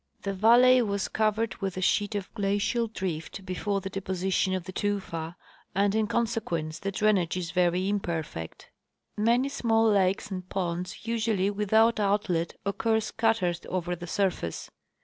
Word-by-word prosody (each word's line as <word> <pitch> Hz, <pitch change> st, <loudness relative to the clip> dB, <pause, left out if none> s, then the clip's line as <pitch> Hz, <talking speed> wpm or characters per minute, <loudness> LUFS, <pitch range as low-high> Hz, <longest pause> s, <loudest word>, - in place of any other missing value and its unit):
The 195 Hz, -, -2 dB
valley 240 Hz, +5 st, +6 dB
was 200 Hz, -3 st, -1 dB
covered 220 Hz, +1 st, 0 dB
with 195 Hz, -2 st, -4 dB
a -, -, -2 dB
sheet 205 Hz, +2 st, +1 dB
of 200 Hz, -2 st, -4 dB
glacial 205 Hz, +3 st, 0 dB
drift 185 Hz, -2 st, -5 dB
before 195 Hz, +2 st, -2 dB
the 195 Hz, -, -5 dB
deposition 190 Hz, 0 st, 0 dB
of 185 Hz, -, -3 dB
the 185 Hz, -, -7 dB
tufa, 180 Hz, -5 st, -3 dB, 0.4 s
and 200 Hz, +1 st, +2 dB
in 220 Hz, 0 st, +1 dB
consequence 170 Hz, -9 st, -1 dB
the 195 Hz, -, -3 dB
drainage 195 Hz, -4 st, +1 dB
is 175 Hz, -2 st, -3 dB
very 180 Hz, +1 st, +2 dB
imperfect. 165 Hz, -, -4 dB, 0.4 s
Many 235 Hz, +5 st, +2 dB
small 225 Hz, -5 st, +2 dB
lakes 195 Hz, 0 st, +1 dB
and 185 Hz, -1 st, -5 dB
ponds, 180 Hz, +1 st, -3 dB
usually 220 Hz, -4 st, +1 dB
without 220 Hz, +3 st, +3 dB
outlet, 200 Hz, -5 st, 0 dB
occur 220 Hz, +2 st, +1 dB
scattered 220 Hz, -6 st, 0 dB
over 180 Hz, -1 st, -2 dB
the 175 Hz, +1 st, -8 dB
surface. 180 Hz, -, -2 dB
195 Hz, 150 wpm, -28 LUFS, 180-220 Hz, 0.4 s, valley